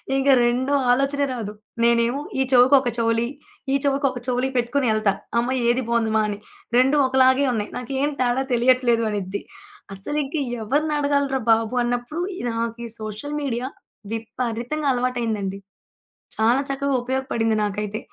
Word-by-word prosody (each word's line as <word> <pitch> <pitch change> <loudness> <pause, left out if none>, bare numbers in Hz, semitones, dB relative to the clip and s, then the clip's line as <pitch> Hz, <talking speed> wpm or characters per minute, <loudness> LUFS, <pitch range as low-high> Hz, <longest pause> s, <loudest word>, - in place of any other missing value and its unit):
ఇంగ 270 +1 0 0.2
రెండో 255 +4 +1 0.2
ఆలోచనే 275 +3 +1
రాదు. 220 -4 -5 0.3
నేనేమో 235 +3 +2 0.2
ఈ - - +4
చెవికొక 255 +1 +6
చౌలి, 230 0 +1 0.4
ఈ - - +3
చెవికి 280 0 +2
ఒకొక 250 -1 -7
చౌలి 250 +1 0
పెట్టుకొని 245 +1 +1
ఎళ్తా 215 -2 +2 0.3
"అమ్మ 250 +2 0
ఏది 245 +2 +2
బాగుందిమా?" 225 -2 +2
అని. 205 - -3 0.4
"2 265 +4 +4
ఒకలాగే 260 +1 +4
ఉన్నాయి, 210 -2 -3
నాకేమి 270 +4 -2
తేడా 250 +1 +1
తెలియట్లేదు" 240 -1 +3
అనిద్ది. 200 -1 -3 0.5
అసలింక 285 +9 -3 0.3
ఎవరినడగాలి‌రా 285 +1 +1
బాబు! 225 +1 +2
అన్నప్పుడు, 245 +7 -2 0.3
నాకీ 230 +1 -3
సోషల్ 215 +7 -5
మీడియా 250 -3 -2 0.5
విపరీతంగా 240 +5 -3
అలవాటయిందండి. 230 -6 -2 0.8
చాలా 230 +4 +3
చక్కగా 280 0 -1
ఉపయోగపడింది 245 -3 0
నాకైతే 210 +1 -3
245 Hz, 125 wpm, -23 LUFS, 230-270 Hz, 0.8 s, చెవికొక